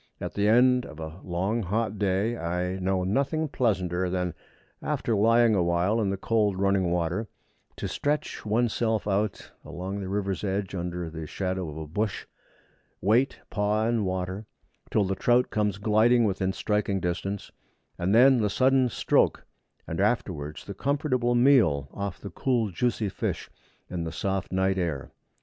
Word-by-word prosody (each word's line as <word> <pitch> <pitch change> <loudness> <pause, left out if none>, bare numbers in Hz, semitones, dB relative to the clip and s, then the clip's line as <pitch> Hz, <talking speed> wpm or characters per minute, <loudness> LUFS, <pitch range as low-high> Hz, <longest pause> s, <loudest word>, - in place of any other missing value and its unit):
At - - -5
the 105 0 +1
end 125 +3 +5
of 75 - -11
a 80 +2 -7
long 95 +6 -1
hot 105 +2 -2
day, 100 +3 +1
I 90 0 -2
know 95 0 0
nothing 140 - 0
pleasanter 95 - 0
than, 90 -1 -1 0.5
after 115 - -1
lying 115 +2 +4
a 95 - +3
while 90 +6 +1
in 100 - +1
the 100 - -1
cold 105 -1 +1
running 100 -2 +2
water, 90 +5 -1 0.5
to - - -4
stretch 150 +1 -2
one's 110 +2 +1
self 110 -3 0
out 100 0 -1
along 90 +5 -5
the 95 -2 -5
river's 100 -1 -2
edge, 100 -1 -2
under 90 -2 -4
the 80 -1 -6
shadow 95 0 -3
of 75 - -8
a 80 - -5
bush, 105 +7 -2 0.8
and - - -6
wait, 125 +5 +2
paw 105 +1 +1
in 115 -2 +1
water, 95 +2 -3 0.4
till 105 - +2
the 95 0 -1
trout 120 +5 +2
comes 105 -3 0
gliding 110 +4 +4
within 95 -2 0
striking 105 -1 -1
distance; 95 +3 -3 0.5
and 95 +4 +2
then 130 +2 +7
the 105 -2 +1
sudden 130 +3 +3
stroke, - - +1 0.4
and 80 +3 -3
afterwards 90 -9 -1
the 100 - -6
comfortable 130 0 0
meal 120 - +4
off 100 -2 -4
the 100 - -8
cool 120 -1 0
juicy 115 +3 0
fish 95 - -4 0.4
in 90 -2 -4
the 80 - -4
soft 95 +1 -2
night 95 0 +1
air. 80 -7 -3
100 Hz, 165 wpm, -27 LUFS, 90-115 Hz, 0.8 s, then